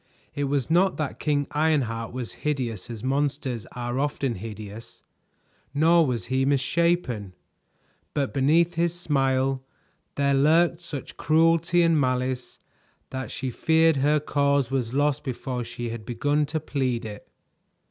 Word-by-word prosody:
It 145 - -1
was 140 +1 -1
not 185 +3 +3
that 155 -3 -3
King 145 -2 +1
Ironheart 140 -8 0
was 125 -6 -5
hideous 125 -10 -2
as 115 -3 -7
monsters 135 -3 -1
are 120 +1 -3
often 140 -3 -1
hideous, 110 +1 -9 0.7
nor 165 +2 +5
was 120 -7 -2
he 130 +2 0
misshapen; 135 - +1 0.8
but 140 -2 0
beneath 160 +6 +3
his 170 +1 0
smile 135 -4 +1 0.5
there 140 0 +2
lurked 165 +5 +3
such 145 -5 -7
cruelty 165 +2 +3
and 165 -3 +3
malice 130 -1 -1 0.5
that 130 0 -4
she 130 -2 -4
feared 160 +3 +3
her 150 +3 +3
cause 140 -2 +1
was 125 -4 -1
lost 145 +2 +1
before 125 -2 -3
she 120 0 -5
had 115 -1 -6
begun 145 +6 0
to 155 +2 -2
plead 130 -6 -2
it. 105 -1 -8
140 Hz, 135 wpm, -25 LUFS, 125-155 Hz, 0.8 s, nor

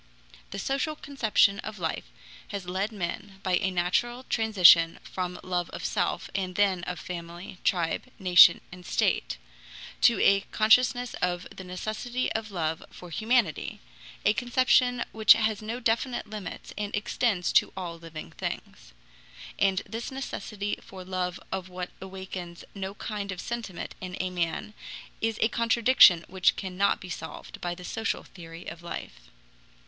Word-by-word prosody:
The 195 - -6
social 275 +8 -1
conception 220 -8 +2
of 215 -1 -6
life 165 - -3 0.4
has 200 -2 -5
led 190 +5 -2
men, 195 0 -5
by 185 -1 +2
a 190 -1 0
natural 190 +8 0
transition 185 -9 +6
from 180 -1 -4
love 180 -2 -1
of - - -6
self 180 -4 -1
and 185 -2 -2
then 190 -3 +2
of 180 - -4
family, 175 +1 -7
tribe, 170 -3 +1
nation, 180 -3 +7
and 180 0 -11
state, 120 - 0 0.6
to - - +5
a 195 0 +5
consciousness 245 +3 +3
of 180 0 0
the 190 - -8
necessity 215 +7 -3
of 220 0 -3
love 160 -4 -2
for 180 -1 -12
humanity, 220 -3 +1 0.5
a 210 - +5
conception 245 0 +3
which 220 -2 +7
has 215 -2 0
no 225 +3 -4
definite 235 0 0
limits 210 -4 -7
and 210 0 -3
extends 205 -2 0
to - - +4
all 170 -3 -5
living 165 -2 -9
things. - - -6 0.7
And 195 -1 +2
this 225 +1 -5
necessity 210 -6 -4
for 185 -1 -11
love 180 -1 -2
of 190 -1 -4
what 180 0 -6
awakens 190 -2 -7
no 195 0 -5
kind 205 -3 -4
of 185 - -6
sentiment 230 -6 -5
in 185 0 -6
a 185 0 -1
man 175 +3 -2 0.5
is 225 -1 0
a - - +5
contradiction 230 -6 +5
which 185 -1 +2
cannot 190 +1 0
be 185 - -10
solved 160 - -8
by 175 0 -2
the 180 - -10
social 225 +2 -2
theory 165 -1 -11
of 165 - -8
life. 170 - -8
190 Hz, 150 wpm, -28 LUFS, 180-220 Hz, 0.7 s, nation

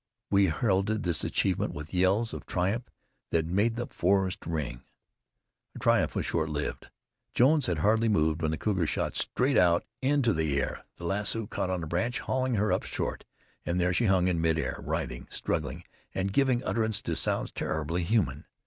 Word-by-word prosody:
We 100 0 +5
heralded 100 +4 +1
this 85 -3 +1
achievement - - 0
with 75 +3 -8
yells 95 +5 +2
of - - -7
triumph 100 +7 -1 0.4
that 80 -1 +1
made 100 +7 +1
the 120 +1 -2
forest 95 -1 0
ring. 75 -7 -2 1.0
Our - - -7
triumph - - +2
was - - -1
short 80 -1 0
lived. 75 -1 -4 0.5
Jones 140 +3 +4
had 85 - 0
hardly 110 +7 +3
moved 80 -5 +2
when 80 - +1
the 80 - -1
cougar 95 -3 0
shot - - -1
straight 130 +2 +1
out 85 -1 +3 0.2
into 135 -4 +2
the 80 -4 0
air. 65 - -3
The 85 - -9
lasso 105 +4 0
caught 95 - -3
on 90 -2 -2
a - - -4
branch, 90 +10 -1
hauling 130 -1 0
her 105 0 +1
up - - +1
short, - - -3 0.4
and 85 +1 -1
there 90 0 +2
she 115 - +2
hung 95 -2 +3
in 85 -3 +1
mid 80 -1 +2
air, 80 - -3
writhing, - - -3
struggling 75 +3 -2 0.3
and 95 +1 -1
giving 130 -1 +2
utterance 110 -2 0
to - - -1
sounds - - 0
terribly 80 +3 -2
human. 85 - 0
95 Hz, 185 wpm, -29 LUFS, 80-110 Hz, 1.0 s, We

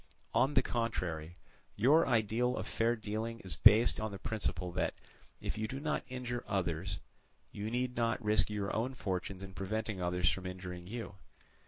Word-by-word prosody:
On 130 +5 +3
the 130 - +6
contrary, 90 -10 -2 0.4
your 145 +10 +5
ideal 120 +1 +2
of - - -3
fair 115 +1 +1
dealing 110 +1 -3
is 95 -3 -4
based 115 +3 +7
on 110 0 -2
the 100 - -5
principle 95 -4 -2
that, - - 0 0.4
if - - -4
you 110 - 0
do 135 +4 -4
not 150 +1 -1
injure 125 -1 -3
others, 90 -1 -1 0.5
you 105 +1 -4
need 125 +1 -1
not 115 -1 +1
risk 105 -4 +3
your 105 -1 -2
own 125 +4 -1
fortunes 95 -3 -3
in 95 -1 -8
preventing 105 +1 -2
others 90 0 +1
from 95 -1 -4
injuring 90 -1 -6
you. 110 -2 -6
110 Hz, 170 wpm, -34 LUFS, 95-120 Hz, 0.5 s, based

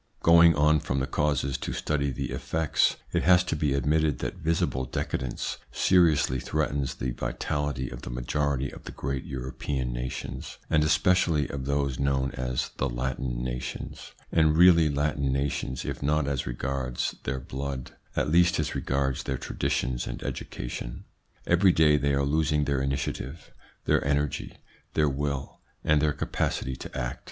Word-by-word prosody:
Going 85 -1 +7
on 75 +1 +4
from 70 -2 -1
the 65 - 0
causes 70 -3 0
to - - -4
study 70 -2 0
the 65 - -4
effects, 80 -2 +1 0.2
it - - +2
has 90 0 +5
to 85 - -2
be 75 -3 +1
admitted 75 +1 +2
that - - -4
visible 80 -5 0
decadence 65 0 -3
seriously 80 -8 +3
threatens 70 -1 -1
the 65 - -2
vitality 75 0 -2
of - - -7
the - - -7
majority 70 +2 -1
of - - -12
the - - -6
great 65 0 -3
European 65 -1 -3
nations, 60 +2 -5
and 75 -1 +4
especially 75 -1 +3
of 65 -2 -4
those 70 -2 0
known 70 -1 +1
as 65 0 -2
the 70 - 0
Latin 60 0 -2
nations, 60 0 -5 0.2
and 80 -1 +4
really 85 -3 +7
Latin 70 -1 0
nations, 65 -1 -2
if - - -4
not 75 +1 +1
as 70 -3 -1
regards 65 +1 -2
their 65 +1 -2
blood, 65 0 -5 0.2
at - - +1
least 85 +3 +4
as 75 -1 -1
regards 70 -1 0
their 65 - -2
traditions - - -1
and - - -5
education. - - -5 0.4
Every 90 +2 +5
day 75 -3 +5
they 70 -1 +1
are 70 0 +1
losing 75 0 +2
their 70 -1 0
initiative, 70 +2 -3 0.3
their - - +3
energy, 70 0 -1 0.4
their 75 -2 +3
will, 70 0 -3 0.2
and 75 -1 +3
their 75 -1 +3
capacity 65 -1 -2
to - - -8
act. 65 0 -3
70 Hz, 160 wpm, -27 LUFS, 65-75 Hz, 0.4 s, Going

